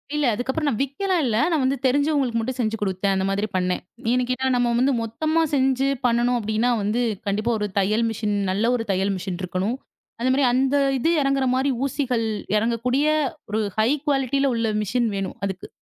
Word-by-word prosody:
இல்ல. 300 -1 +1
அதுக்கப்புறம் 265 +6 -2
நான் 220 - -2
விக்கலாம் 345 +7 0
இல்ல. 230 -4 0 0.2
நான் 310 -5 +1
வந்து 265 +2 +1
தெரிஞ்சவங்களுக்கு 275 -3 +2
மட்டும் 250 +3 -3
செஞ்சு 225 -2 0
கொடுத்தேன். 195 0 0
அந்த 190 0 0
மாதிரி 200 +2 -1
பண்ணேன். 180 0 0 0.3
ஏன் 250 0 +2
கேட்டா? 260 +1 0
நம்ம 245 -1 +2
வந்து 265 +2 +3
மொத்தமா 310 +9 0
செஞ்சு 265 0 +2 0.2
பண்ணனும் 240 +1 +2
அப்படின்னா 220 +3 0
வந்து 210 +4 0 0.3
கண்டிப்பா 210 +4 0
ஒரு 210 - -1
தையல் 215 +4 +1
மிஷின் 210 -1 -2 0.2
நல்ல 215 +5 +1
ஒரு 230 -2 -3
தையல் 195 +1 0
மிஷின் 180 -1 -5
இருக்கணும். 185 +7 -2 0.4
அந்த 250 +2 +1
மாதிரி 275 +1 +2
அந்த 265 +2 +2 0.2
இது 320 - +1
எறங்குற 275 -1 +1
மாதிரி 265 +2 +1 0.2
ஊசிகள் 255 -4 -1 0.3
எறங்கக்கூடிய 240 +5 0 0.5
ஒரு 215 +1 0 0.2
ஹை 215 +2 +3 0.2
குவாலிட்டில 275 -1 +1
உள்ள 230 -1 0
மிஷின் 235 +3 0
வேணும் 195 -1 -4
அதுக்கு. 190 -2 -5
240 Hz, 180 wpm, -23 LUFS, 210-270 Hz, 0.5 s, வந்து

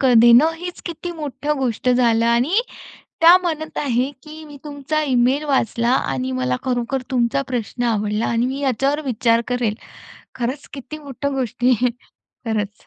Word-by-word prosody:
क 260 -2 +4
देणं 240 +7 +6
हीच 355 +1 -7
किती 345 +1 -5
मोठं 295 -2 -3
गोष्ट 255 0 -1
झालं 235 -2 +3
आणि 245 - +3 0.6
त्या 335 +2 +9
म्हणत 315 -4 -4
आहे, 255 -1 0
की 310 +2 -11
"मी 290 -2 -12
तुमचा 295 +1 -2
ईमेल 260 +1 +2
वाचला 240 -4 +1 0.2
आणि 130 -1 -2
मला 125 0 0
खरोखर 250 +1 -1
तुमचा 250 +2 +1
प्रश्न 245 -1 -3
आवडला 215 -1 0
आणि 235 +1 +1
मी 265 +2 -3
याच्यावर 275 +2 0
विचार 230 -2 +2
करेल." 245 -4 0 0.6
खरंच 255 +4 -4
किती 280 +2 -8
मोठ 280 -2 -6
गोष्टी 255 -3 0
आहे 250 0 +2
खरंच. 220 -3 -7
255 Hz, 155 wpm, -20 LUFS, 235-290 Hz, 0.6 s, त्या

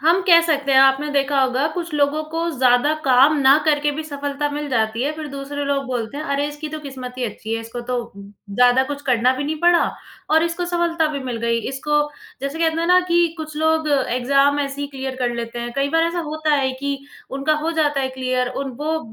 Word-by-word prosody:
हम 335 +5 +3
कह 340 -2 +8
सकते 285 -4 +1
हैं, 265 - +6
आपने 270 +2 +4
देखा 280 0 +1
होगा 260 +2 +1
कुछ 345 -2 -4
लोगों 295 +1 +1
को 330 +1 -2
ज़्यादा 255 +4 +3
काम 270 +3 +5
ना 270 +1 +6
करके 295 -1 +2
भी 315 - -3
सफ़लता 285 -1 -3
मिल 295 0 -4
जाती 225 -2 0
है, 290 +3 0
फ़िर 310 -1 -6
दूसरे 280 +1 -4
लोग 280 -1 -1
बोलते 245 0 -4
हैं 305 - -4
अरे! 280 -1 -1
इसकी 295 +1 -7
तो 310 +1 -6
किस्मत 260 -3 -8
ही 250 - -1
अच्छी 220 0 -4
है। 225 - -2
इसको 230 +2 -7
तो 250 - 0 0.2
ज़्यादा 205 +5 +1
कुछ 285 +1 -6
करना 250 -2 +2
भी 285 - -3
नहीं 310 +2 -2
पड़ा 345 0 +4 0.5
और 320 +1 +4
इसको 335 +1 -1
सफ़लता 345 -2 0
भी 285 - -3
मिल 250 -2 -3
गई। 235 0 +1
इसको 295 +3 0 0.4
जैसे 275 +3 -4
कहते 325 0 +1
हैं 335 - 0
ना 360 +1 +6
कि 345 0 +4
कुछ 310 -1 -7
लोग 315 0 +1
एग्ज़ाम 275 +1 +2
ऐसे 280 0 -4
ही 285 - -2
क्लियर 265 -1 -5
कर 245 -2 -1
लेते 235 0 -5
हैं। 240 0 -4
कई 275 0 +1
बार 325 +1 +3
ऐसा 335 +1 -2
होता 310 0 0
है 270 -2 +1
कि 280 0 -2 0.3
उनका 275 +3 0
हो 325 - 0
जाता 295 -3 +1
है 265 - -1
क्लियर 255 -1 0
उन 275 - -5
वो 315 +2 0
280 Hz, 230 wpm, -21 LUFS, 260-310 Hz, 0.5 s, कह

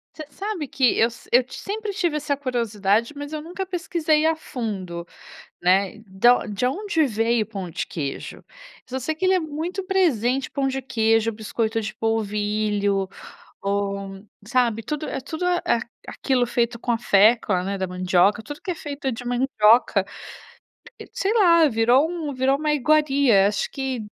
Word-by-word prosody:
Você 310 -2 -8
sabe 395 -7 -4
que 260 -2 +2
eu 230 - +5
se 235 - -14
eu 245 +1 +6
ti - - -11
sempre 420 +1 -4
tive 345 -5 -1
essa 290 -1 -1
curiosidade, 230 -3 0
mas 290 +1 -7
eu 305 - -3
nunca 355 +5 -5
pesquisei 335 -4 0
a 325 - +3
fundo, 195 - -5 0.6
né. 190 +3 +2
Da 220 +6 +4
on - - -7
de 210 +4 -1
onde 330 +1 0
veio 225 0 +1
o - - -18
pão 195 -4 -6
de - - -4
queijo. 140 -5 -6 0.5
Só 260 +1 -3
sei 290 +5 -2
que 370 +4 -1
ele 375 - +4
é 365 - +2
muito 330 +5 -4
presente, 270 - +1
o - - -42
pão 275 -1 0
de 270 0 -1
queijo, 225 -2 +1
o - - -8
biscoito 225 +1 -2
de 215 0 -5
polvilho 210 -2 0 0.6
ou 200 -1 -2 0.2
sabe, 235 -3 +1
tudo 300 +3 -4
é - - -3
tudo 315 +6 -5
a 360 - +3
eh, - - 0
a - - +2
aqui 230 - -5 0.3
aquilo 250 -3 0
feito 235 0 -1
com 240 - -4
a 230 - 0
fécula, 210 -3 +3
né, 195 +1 -3
da 190 - -1
mandioca. 185 +4 +2
Tudo 290 +6 -9
que 370 - -4
é - - -1
feito 285 -3 -4
de 245 +2 -7
mandioca, 245 -2 +3 0.9
se - - -11
sei 400 +3 0
lá, 335 -7 +5
virou 245 +4 +3
um 320 -5 -4
virou 265 +2 +1
uma 300 0 0
iguaria. 280 -8 +3
Acho 205 - -1
que, 265 -3 -3
245 Hz, 185 wpm, -23 LUFS, 210-305 Hz, 0.9 s, eu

